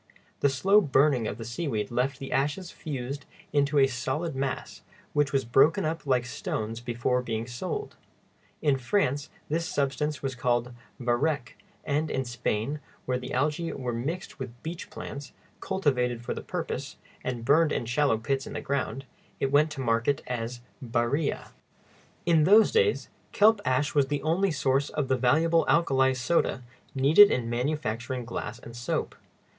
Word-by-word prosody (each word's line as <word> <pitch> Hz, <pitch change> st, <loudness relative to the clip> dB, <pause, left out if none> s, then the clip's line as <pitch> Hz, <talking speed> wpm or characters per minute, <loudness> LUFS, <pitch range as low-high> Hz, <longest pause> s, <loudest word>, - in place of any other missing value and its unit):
The 140 Hz, -, +3 dB
slow 195 Hz, +11 st, +4 dB
burning 135 Hz, -, +3 dB
of 105 Hz, -, -4 dB
the 115 Hz, -, -7 dB
seaweed 120 Hz, -3 st, -3 dB
left 125 Hz, +3 st, 0 dB
the 135 Hz, +1 st, -7 dB
ashes 150 Hz, +7 st, -1 dB
fused 140 Hz, -1 st, -5 dB, 0.3 s
into 145 Hz, 0 st, +2 dB
a 135 Hz, -, +7 dB
solid 135 Hz, +5 st, -2 dB
mass, 135 Hz, 0 st, -3 dB, 0.3 s
which 145 Hz, -1 st, +2 dB
was 135 Hz, -2 st, +1 dB
broken 155 Hz, +10 st, +4 dB
up 160 Hz, -1 st, -3 dB
like 125 Hz, -2 st, +2 dB
stone 110 Hz, -2 st, -3 dB
before 120 Hz, +1 st, 0 dB
being 115 Hz, -2 st, -3 dB
sold. 180 Hz, -, -5 dB, 0.7 s
In 140 Hz, -3 st, +3 dB
France 140 Hz, 0 st, 0 dB, 0.2 s
this 165 Hz, +2 st, -1 dB
substance 145 Hz, +1 st, -1 dB
was 135 Hz, -1 st, -1 dB
called 120 Hz, 0 st, 0 dB, 0.3 s
varec; 125 Hz, +2 st, 0 dB, 0.4 s
and 150 Hz, +1 st, 0 dB
in 130 Hz, 0 st, -1 dB
Spain, 120 Hz, +3 st, -2 dB, 0.3 s
where 125 Hz, -1 st, 0 dB
the 125 Hz, -, -7 dB
algæ 150 Hz, +5 st, -1 dB
were 125 Hz, -2 st, -3 dB
mixed 150 Hz, +9 st, -4 dB
with 120 Hz, -2 st, -8 dB
beach 165 Hz, +2 st, -6 dB
plants, 140 Hz, 0 st, -8 dB, 0.3 s
cultivated 125 Hz, -11 st, 0 dB
for -, -, -2 dB
the -, -, -6 dB
purpose, -, -, -4 dB, 0.3 s
and 120 Hz, -2 st, -3 dB
burned 150 Hz, +4 st, +4 dB
in -, -, -1 dB
shallow 130 Hz, 0 st, +2 dB
pits 135 Hz, +4 st, -2 dB
in -, -, -7 dB
the -, -, -3 dB
ground, 135 Hz, 0 st, -2 dB, 0.3 s
it 135 Hz, -, 0 dB
went 150 Hz, +2 st, +4 dB
to 135 Hz, -, -5 dB
market 115 Hz, +3 st, +1 dB
as 120 Hz, 0 st, -4 dB, 0.2 s
barilla. 120 Hz, +5 st, -1 dB, 0.8 s
In 165 Hz, -3 st, +4 dB
those 210 Hz, +5 st, +6 dB
days, 455 Hz, -2 st, +2 dB, 0.2 s
kelp 215 Hz, 0 st, +5 dB
ash 130 Hz, +3 st, +1 dB
was 140 Hz, -2 st, +3 dB
the 145 Hz, 0 st, -2 dB
only 175 Hz, +5 st, +2 dB
source 140 Hz, -2 st, +1 dB
of 145 Hz, -3 st, -2 dB
the 130 Hz, -, +4 dB
valuable 160 Hz, +7 st, +3 dB
alkali 135 Hz, -5 st, +3 dB
soda 130 Hz, 0 st, 0 dB, 0.3 s
needed 155 Hz, +10 st, +7 dB
in 115 Hz, -2 st, -1 dB
manufacturing 125 Hz, -2 st, -2 dB
glass 115 Hz, -1 st, -5 dB
and 115 Hz, -1 st, -11 dB
soap. 120 Hz, 0 st, -2 dB
135 Hz, 160 wpm, -28 LUFS, 125-150 Hz, 0.8 s, a